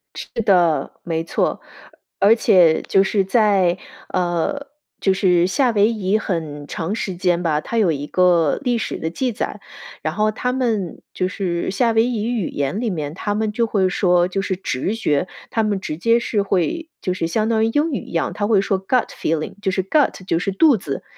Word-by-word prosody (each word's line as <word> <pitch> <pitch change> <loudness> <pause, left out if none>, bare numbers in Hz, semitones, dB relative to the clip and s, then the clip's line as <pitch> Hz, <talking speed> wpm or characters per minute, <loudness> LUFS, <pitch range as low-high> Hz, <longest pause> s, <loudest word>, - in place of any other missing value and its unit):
是 - - -7 0.2
的， 175 -6 +3
没 165 -2 -2
错。 - - -1 0.6
而 210 +3 +6
且 175 -8 +4
就 195 - +3
是 195 0 +1
在 195 -3 +2 0.3
呃， 180 - -1 0.3
就 195 - +2
是 180 -2 +3
夏 245 +8 +2
威 205 -1 +4
夷 210 -2 0
很 160 -8 -4
长 170 +7 -3
时 195 -5 -3
间 175 -1 0
吧， 155 -3 +1
它 230 - -4
有 200 -7 +3
一 145 -1 -4
个 175 -4 +3
历 245 -3 +1
史 225 - -3
的 160 - -3
记 250 +9 -2
载， 210 - -4 0.4
然 155 +1 -3
后 215 +1 +2
它 250 +3 -2
们 225 -9 -2
就 185 - -1
是 180 -2 -2
夏 230 +4 +1
威 225 0 +3
夷 230 -4 -2
语 225 -8 -1
言 140 +7 -2
里 235 -1 -1
面， 155 -6 -4
它 205 +4 -3
们 215 0 -1
就 230 +2 0
会 195 -4 +1
说， 180 -2 +2
就 195 +2 -2
是 195 -1 -2
直 185 - -2
觉， 175 -7 0 0.2
它 225 - +1
们 210 -2 0
直 155 - -5
接 230 +6 +3
是 220 -3 -1
会， 200 - -1
就 185 - -1
是 175 -3 -2
相 215 +6 0
当 220 -1 +2
于 - - +3
英 300 +6 +1
语 260 - -2
一 - - -12
样， 165 - -1
它 205 - -1
会 215 -3 +4
说 195 -1 -1
gut 255 -2 +2
feeling， 155 -1 -2
就 200 - 0
是 190 0 0
gut， 230 -3 +1
就 165 - 0
是 195 - -2
肚 285 +8 +5
子， 150 -9 -5
195 Hz, 250 characters per minute, -20 LUFS, 175-220 Hz, 0.6 s, 而